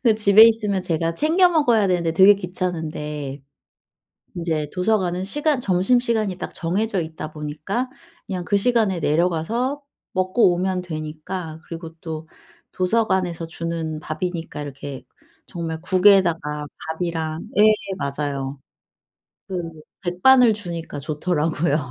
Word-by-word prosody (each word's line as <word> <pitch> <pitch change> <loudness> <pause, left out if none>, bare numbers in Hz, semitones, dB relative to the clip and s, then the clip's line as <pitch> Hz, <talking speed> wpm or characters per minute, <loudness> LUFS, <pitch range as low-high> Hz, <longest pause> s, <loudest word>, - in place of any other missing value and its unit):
근데 230 -4 +4
집에 210 0 +7
있으면 210 -4 +2
제가 165 -1 -1
챙겨 340 - +4
먹어야 240 - +3
되는데 170 -3 +1
되게 190 +4 +7
귀찮은데 155 -6 -4 0.9
인제 160 -3 -1
도서관은 185 -2 0
시간 295 +4 0
점심시간이 215 +1 +1
딱 - - -5
정해져 195 +4 -1
있다 160 -1 -6
보니까 155 - -3 0.4
그냥 180 -2 -4
그 200 - +1
시간에 215 -5 +2
내려가서 180 - 0 0.3
먹고 185 +1 +3
오면 185 0 -1
되니까 160 +1 -6
그리고 165 -1 -7
또 160 -1 -6 0.4
도서관에서 185 -4 0
주는 165 -1 -4
밥이니까 165 -1 -4
이렇게 140 -1 -7 0.4
정말 165 -2 -5
국에다가 180 -6 +3 0.3
밥이랑 165 -2 -2 0.2
예 - - +7 0.4
맞아요. 140 -1 -3 0.9
그 185 -2 -3 0.4
백반을 225 +7 +5
주니까 170 -7 -6
좋더라고요. 155 +1 0
175 Hz, 290 characters per minute, -22 LUFS, 160-200 Hz, 0.9 s, 집에